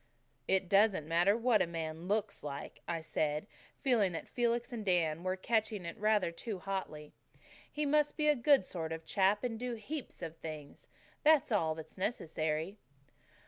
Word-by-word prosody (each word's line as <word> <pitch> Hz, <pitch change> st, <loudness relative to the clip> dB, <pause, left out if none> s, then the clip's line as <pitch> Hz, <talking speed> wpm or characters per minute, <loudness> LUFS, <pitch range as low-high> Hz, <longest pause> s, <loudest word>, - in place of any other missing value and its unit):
"It 190 Hz, -1 st, +2 dB
doesn't 195 Hz, -5 st, +4 dB
matter 175 Hz, +6 st, +3 dB
what 235 Hz, -2 st, +3 dB
a -, -, +2 dB
man 165 Hz, 0 st, -5 dB
LOOKS 210 Hz, 0 st, -1 dB
like," 140 Hz, -1 st, -7 dB
I 170 Hz, -1 st, -2 dB
said, 155 Hz, -1 st, -1 dB, 0.4 s
feeling 220 Hz, -9 st, +3 dB
that 165 Hz, -, -5 dB
Felix 240 Hz, +1 st, 0 dB
and 225 Hz, -3 st, -4 dB
Dan 170 Hz, -5 st, +1 dB
were 185 Hz, 0 st, 0 dB
catching 215 Hz, -1 st, 0 dB
it 170 Hz, -, -5 dB
rather 210 Hz, -4 st, +2 dB
too 205 Hz, +4 st, -5 dB
hotly. 180 Hz, -6 st, -5 dB, 0.6 s
"He 300 Hz, 0 st, -1 dB
must 295 Hz, +1 st, +2 dB
be 300 Hz, -1 st, +1 dB
a 300 Hz, -, +5 dB
good 265 Hz, -3 st, +4 dB
sort 160 Hz, -3 st, -4 dB
of 160 Hz, 0 st, -5 dB
chap 200 Hz, +4 st, +2 dB
and 230 Hz, -3 st, -2 dB
DO 245 Hz, -1 st, -3 dB
heaps 240 Hz, -1 st, -6 dB
of 165 Hz, -1 st, -6 dB
things. 155 Hz, -3 st, -8 dB, 0.4 s
That's 300 Hz, -3 st, +5 dB
all 160 Hz, -7 st, +2 dB
that's 160 Hz, +3 st, -10 dB
necessary." 160 Hz, -2 st, -2 dB
190 Hz, 170 wpm, -33 LUFS, 165-230 Hz, 0.6 s, a